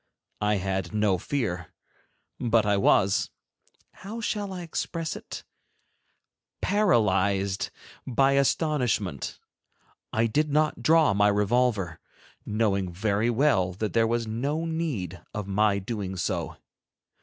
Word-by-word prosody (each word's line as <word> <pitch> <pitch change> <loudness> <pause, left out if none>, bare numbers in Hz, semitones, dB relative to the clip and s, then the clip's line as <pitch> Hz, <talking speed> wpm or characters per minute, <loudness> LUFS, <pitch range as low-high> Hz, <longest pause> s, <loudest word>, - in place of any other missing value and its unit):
I 105 0 +2
had 95 -1 -2
no 105 -4 +2
fear, 90 - -3 0.7
but 115 -2 +2
I 105 -1 +3
was—how 100 - -1
shall 205 -3 -2
I 180 -2 -5
express 165 0 -3
it—paralyzed 100 - -2 0.4
by 135 +2 +3
astonishment. 135 - 0 0.7
I 110 +1 +2
did 150 +7 +1
not 150 +1 +1
draw 160 -7 +4
my 100 +1 +4
revolver, 105 -3 +1 0.5
knowing 100 -4 0
very 105 +4 0
well 120 -7 +2
that 105 +3 -3
there 115 -1 +3
was 115 0 0
no 140 +9 -2
need 140 - -3
of 105 -2 -3
my 100 +1 +2
doing 100 -2 -4
so. 90 - -3
110 Hz, 110 wpm, -27 LUFS, 100-145 Hz, 0.7 s, draw